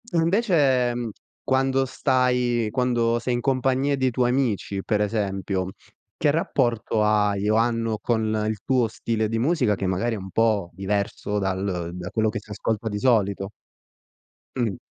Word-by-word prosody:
Invece, 165 - +3
ehm, 120 -1 -3 0.3
quando 135 0 +1
stai 125 -3 +1
quando 120 -1 +1
sei 125 +1 -2
in - - -1
compagnia 135 +2 +1
dei 130 -1 +1
tuoi 120 +1 +1
amici, 110 -6 -1
per 105 - 0
esempio, 100 -3 -1 0.5
che 150 - +3
rapporto 120 -8 0
hai 105 -1 +2
o 110 - +3
hanno 115 -1 +1
con 110 0 0 0.3
il 110 - -2
tuo 125 -4 +2
stile 110 -1 -2
di 115 0 -1
musica 125 -5 +2
che 95 - -4
magari 95 +6 0
è - - -5
un 95 -1 -8
po' 105 -4 +1
diverso 100 +2 -2
dal 95 -3 -2
da 90 0 -6
quello 110 +2 +1
che 110 +1 -2
si 105 - -15
ascolta 110 +2 -2
di 105 -1 -3
solito? 100 -5 +1 1.0
Mh. 115 -7 0
115 Hz, 155 wpm, -24 LUFS, 105-125 Hz, 1.0 s, Invece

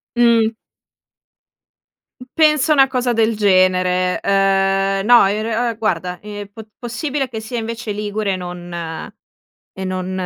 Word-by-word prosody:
Mh. 235 -2 +4 1.8
Penso 305 -1 +3
una 270 -2 +5
cosa 250 -1 -1
del 225 0 +1
genere. 185 -2 +2
Ehm, 195 0 +1
no, 240 -4 +6
in 205 +2 -1
re 230 +2 -1
ehm, 230 - -5
guarda, 180 -5 -2
ehm, 205 -1 -8
pot 220 +1 -11
possibile 270 +3 -3
che 225 -2 -5
sia 220 +2 -5
invece 230 0 -5
ligure 205 -1 -2
e - - -1
non 175 -1 -8 1.1
e 190 - -5
non 185 0 -3
210 Hz, 135 wpm, -18 LUFS, 195-235 Hz, 1.8 s, no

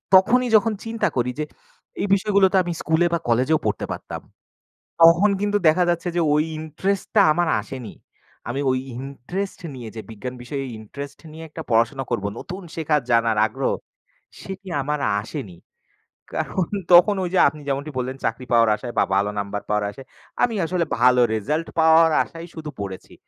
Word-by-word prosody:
তখনই 245 +7 +5
যখন 220 +1 +4
চিন্তা 225 0 0
করি 125 0 +1
যে 150 - 0 0.6
এই 205 - 0
বিষয়গুলো 200 0 +3
তো - - +5
আমি 175 -1 -3
স্কুলে 160 +3 +2
বা 170 - +2
কলেজেও 130 +7 +3
পড়তে - - -1
পারতাম। - - -6 0.8
তখন 170 +5 +7
কিন্তু 205 0 +1
দেখা 175 +3 +4
যাচ্ছে 170 +1 -1
যে - - +3
ওই 150 +1 +3 0.2
interest-টা 190 +7 -1
আমার 175 +1 +1
আসেনি। 130 -4 -8 0.5
আমি 130 +4 -2
ওই 130 - +1 0.2
interest 140 +9 -5 0.2
নিয়ে 120 -3 -7
যে - - -4
বিজ্ঞান 120 +4 -6
বিষয়ে 135 +3 -4
interest 140 +6 -9
নিয়ে 160 +1 -9
একটা 160 +1 -7
পড়াশোনা 120 +4 +2
করব, 100 - -1
নতুন 190 +2 -7
শেখার 155 -3 +1
জানার 115 -2 +3
আগ্রহ। 130 +5 -2 0.7
সেটি 195 0 -8
আমার 150 +2 -1 0.2
আসেনি। 110 - -7 0.8
কারন 185 -3 -1 0.3
তখন 175 +4 +8
ওই - - -1
যে - - +4
আপনি 155 - -7
যেমনটি 140 +2 -2
বললেন 130 +1 -3
চাকরি 120 +3 -2
পাওয়ার 115 -1 +5
আশায় 120 +3 -7
বা - - +5
ভালো 100 +1 +2
number 100 0 -3
পাওয়ার 105 0 +1
আশায়, 135 +6 -12 0.4
আমি 235 -2 +2
আসলে 175 +1 0 0.2
ভালো 125 0 +5
result 150 +10 -1
পাওয়ার 160 0 +6
আশায় 165 0 -10
শুধু 155 -2 -6
পড়েছি। 95 -2 -7
150 Hz, 170 wpm, -22 LUFS, 125-175 Hz, 0.8 s, তখন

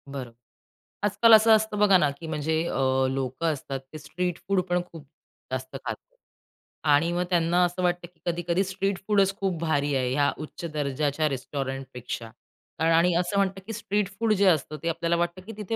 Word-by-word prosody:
बरं. 135 -4 -6 0.7
आजकाल 210 +3 +5
असं 220 +1 +7
असतं 215 -1 -1
बघा 200 -2 +6
ना, 150 -5 +2
की 160 +4 -10
म्हणजे 160 +1 -1
अ, 130 -2 +1
लोकं 135 +5 -1
असतात 135 -1 -5
ते - - -6
स्ट्रीट 175 +4 -3
फूड 195 -1 +2
पण 175 0 +2
खूप 155 -4 -11 0.4
जास्त 130 0 -4
खातात. - - -7 0.7
आणि 150 +2 +3
मग 175 +1 0
त्यांना 175 0 +3
असं 175 +1 -3
वाटतं, 175 -1 0
की 175 -1 -32
कधी-कधी 175 +2 0
स्ट्रीट 195 0 -2
फूडच 195 -2 +3
खूप 190 -4 -1
भारी 145 -3 +1
आहे 130 -1 0
या 145 +1 +2
उच्च 155 +2 -7
दर्जाच्या 145 +1 0
रेस्टॉरंटपेक्षा 130 -3 -5 0.5
कारण 165 +1 +3
आणि 170 +2 +4
असं 180 +3 0
म्हणतात, 195 -1 0
की 225 - -4
स्ट्रीट 205 -2 -1
फूड 225 -2 +3
जे 200 -1 +2
असतं 155 -2 0
ते 170 - 0
आपल्याला 170 +1 0
वाटतं, 175 +2 -2
की 225 - -7
तिथे 215 +1 -3
170 Hz, 185 wpm, -26 LUFS, 145-190 Hz, 0.7 s, असं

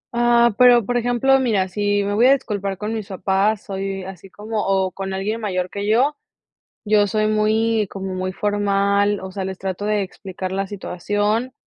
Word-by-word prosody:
Ah, 235 -1 +4
pero, 245 -3 +6
por 245 - -2
ejemplo, 245 +3 +2
mira, 215 -7 +1
si 205 +1 0
me 200 +1 -2
voy 230 +5 +4
a 270 - +7
disculpar 200 -7 -3
con 210 +4 -4
mis 215 -3 -4
papás, 195 +2 0
soy 195 -1 -4
así 190 0 -10
como 210 +2 -4
o 190 -1 +1
con 195 0 -5
alguien 210 +4 -3
mayor 185 -3 -2
que 200 0 -4
yo, 260 +7 +3 0.7
yo 210 -1 +3
soy 215 +1 0
muy 215 0 +1
como 195 -1 -5
muy 185 0 -3
formal, 200 0 +1
o 190 0 -7
sea, 190 0 -4
les 190 -1 -5
trato 190 +1 -4
de 210 -1 +1
explicar 190 -1 -6
la 195 0 -2
situación, 205 +5 -2
205 Hz, 185 wpm, -21 LUFS, 195-220 Hz, 0.7 s, a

